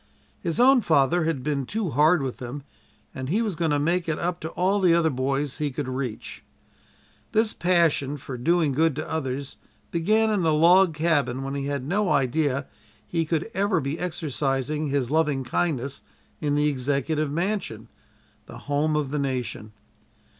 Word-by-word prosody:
His 170 +1 -3
own 260 +1 +6
father 160 - +2
had 155 -6 -1
been 140 -3 -2
too 210 -6 -2
hard 150 +3 +4
with 130 -2 -4
him, 130 +3 -6 0.5
and 130 0 -5
he 215 +8 +1
was 210 -6 -2
going 165 0 0
to 145 - +2
make 170 +3 0
it 155 - 0
up 175 0 -2
to 160 - -5
all 190 +3 +1
the 180 -3 +4
other 165 -2 +2
boys 135 +2 -2
he 150 -1 0
could 140 0 -4
reach. 130 -4 -5 0.9
This 220 0 +2
passion 165 -5 +2
for 135 -1 -7
doing 160 +4 +2
good 155 +2 +2
to 155 - -4
others 140 -3 -4 0.3
began 215 +6 +2
in 205 -3 +1
the 160 -2 +2
log 175 +2 +5
cabin 145 -5 +1
when 135 0 -4
he 140 0 -3
had 140 -2 -2
no 195 +7 0
idea 140 0 +1 0.4
he 165 +4 -1
could 165 +7 -2
ever 200 -3 +1
be 145 +3 -3
exercising 150 -3 -2
his 140 -2 -1
loving 150 -4 +1
kindness 140 0 -2 0.4
in 145 -2 0
the 150 0 +2
Executive 145 +2 -1
Mansion 170 - -2 0.6
the 120 - -10
Home 145 +4 0
of 145 -3 -1
the 150 - -1
Nation. 125 -6 -3
150 Hz, 175 wpm, -25 LUFS, 135-170 Hz, 0.9 s, own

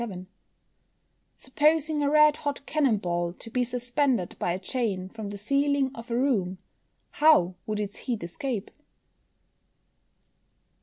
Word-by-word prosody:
_Supposing 300 +2 +1
a 285 - +2
red 300 0 +5
hot 285 -1 -4
cannon 275 -8 +2
ball 175 -2 -2
to 225 +5 -11
be 250 +1 +1
suspended 245 - 0
by 175 - 0
a 175 - -1
chain 190 -3 -2
from 220 -1 -7
the 200 - -6
ceiling 275 +4 +1
of 230 +1 -10
a 235 - 0
room, 210 -9 +1 0.5
how 295 - +4
would 215 -1 -2
its 205 0 -3
heat 235 -7 -3
escape? 225 +4 -4
245 Hz, 130 wpm, -27 LUFS, 200-285 Hz, 0.5 s, red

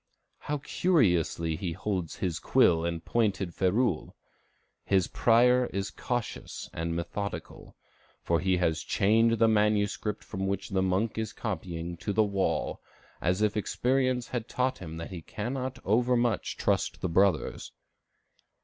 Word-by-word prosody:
How 150 - -2
curiously 90 - +1
he 85 0 -3
holds 95 -2 -3
his 90 -4 -2
quill 80 -1 +4
and 85 -1 -3
pointed 100 -6 0
ferule! 95 0 0 0.7
His 95 -3 +2
prior 125 +2 +4
is 100 0 -3
cautious 120 -2 -4
and 85 0 -2
methodical; 100 +4 -5 0.5
for 85 -1 +2
he 95 -1 +2
has 80 -2 +1
chained 115 +6 +3
the 115 0 +4
manuscript 105 -1 +1
from 95 0 -4
which 100 0 -2
the 95 -1 +1
monk 95 +5 0
is 110 -1 -3
copying 85 0 -4
to 100 +4 -3
the 110 - +4
wall, 100 -2 -1 0.4
as 90 +5 +1
if 105 -1 +1
experience 125 +3 0
had 120 -2 -3
taught 130 +1 -1
him 80 -3 -7
that 85 +2 -7
he 90 -3 -6
cannot 125 - -4
overmuch 120 +1 +1
trust - - 0
the - - 0
brothers. 90 -2 +1
100 Hz, 140 wpm, -29 LUFS, 90-115 Hz, 0.7 s, quill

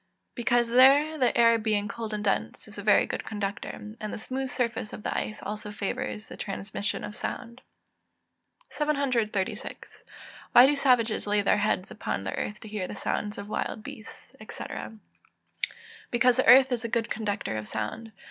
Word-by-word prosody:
_ - - -45 0.3
Because 240 -1 +2
there 275 +6 +6
the 250 - +2
air, 230 -1 +6
being 210 -2 0
cold 230 -1 -5
and 210 -1 -3
dense, 195 - -1
is - - -9
a - - -3
very - - +5
good - - -4
conductor; 205 -2 -4 0.3
and 215 -1 -4
the - - -4
smooth 260 +4 -3
surface 240 -4 -2
of 210 - -8
the - - -2
ice 215 - -3
also 210 +1 -5
favours 205 +1 -3
the - - -9
transmission 200 +1 -4
of 210 - -6
sound. 235 0 -5 1.1
736. 255 -10 -1 0.5
Why 245 - +10
do 290 +2 +3
savages 245 -7 +2
lay 205 0 +2
their 205 - +3
heads 205 -1 0
upon 95 - -3
the 95 - -3
earth 210 0 -4
to - - -9
hear 205 -3 -3
the - - -7
sounds 210 +1 -2
of 200 - -6
wild 215 0 -3
beasts, 220 - -11
&c.? - - -6 1.5
Because 245 +1 +4
the 260 - +2
earth 265 +1 +8
is 240 -2 -1
a 230 - -3
good 230 0 -1
conductor 205 - -2
of 110 -1 -4
sound. 165 - -4
220 Hz, 175 wpm, -28 LUFS, 205-245 Hz, 1.5 s, Why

